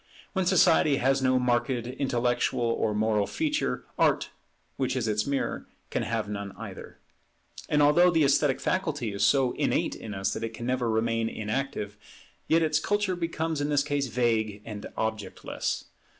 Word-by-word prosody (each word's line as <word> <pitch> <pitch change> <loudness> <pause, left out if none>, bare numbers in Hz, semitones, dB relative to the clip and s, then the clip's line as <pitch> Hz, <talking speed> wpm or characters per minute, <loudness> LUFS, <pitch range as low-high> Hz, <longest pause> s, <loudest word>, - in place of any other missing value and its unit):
When 190 -2 0
society 175 -5 +5
has 135 +1 +2
no 130 0 +3
marked 125 0 +1
intellectual 125 -1 0
or 115 -2 0
moral 105 -1 +1
feature, 300 -2 -1
Art, - - +2 0.4
which 130 -1 -1
is 120 -3 -1
its 105 +1 0
mirror, 140 -1 -2 0.2
can - - 0
have - - -2
none 100 -1 -5
either. - - -9 0.7
And 150 0 +4
although 170 +5 +6
the 165 -3 +3
esthetic 140 -1 +3
faculty 150 - -1
is 100 - -1
so 135 -3 +4
innate - - 0
in 105 -2 -7
us 95 0 -1
that - - -5
it 115 0 -5
never 125 0 -1
can 110 - 0
remain 115 0 +1
inactive, 105 -1 -3 0.5
yet 165 +1 +4
its 155 -1 +2
culture 205 +1 0
becomes 165 -3 -2
in 145 - -1
this 145 -1 +3
case 145 -2 -1
vague 110 -4 0
and 105 -2 -6
objectless. 110 -3 -3
130 Hz, 165 wpm, -27 LUFS, 110-150 Hz, 0.7 s, although